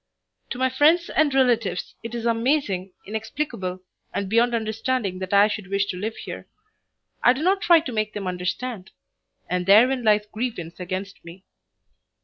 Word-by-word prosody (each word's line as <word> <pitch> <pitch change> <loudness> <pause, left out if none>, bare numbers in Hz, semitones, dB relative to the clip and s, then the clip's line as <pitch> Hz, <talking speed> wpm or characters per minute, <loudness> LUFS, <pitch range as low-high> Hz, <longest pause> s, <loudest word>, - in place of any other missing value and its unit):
To - - -4
my 260 0 +1
friends 315 +6 +3
and 310 -2 +3
relatives 240 -8 +1
it 230 +1 -6
is 235 -1 -4
amazing, 230 -5 0
inexplicable, 215 -4 -4 0.3
and 200 - -3
beyond 235 +4 +2
understanding 220 -3 -2
that 185 0 -5
I 200 +1 +6
should 210 -2 -5
wish 200 +1 0
to - - -7
live 215 +5 -4
here. - - -8 0.7
I 245 - +6
do 270 +4 -4
not 385 +2 +2
try 340 -2 +6
to 280 - -6
make 215 -2 -2
them 205 -2 -5
understand; 185 +3 -4 0.6
and 180 0 -2
therein 245 +6 +5
lies 210 -1 +3
grievance 210 -7 -5
against 185 +2 -5
me. 170 +3 -12
220 Hz, 160 wpm, -24 LUFS, 190-255 Hz, 0.7 s, I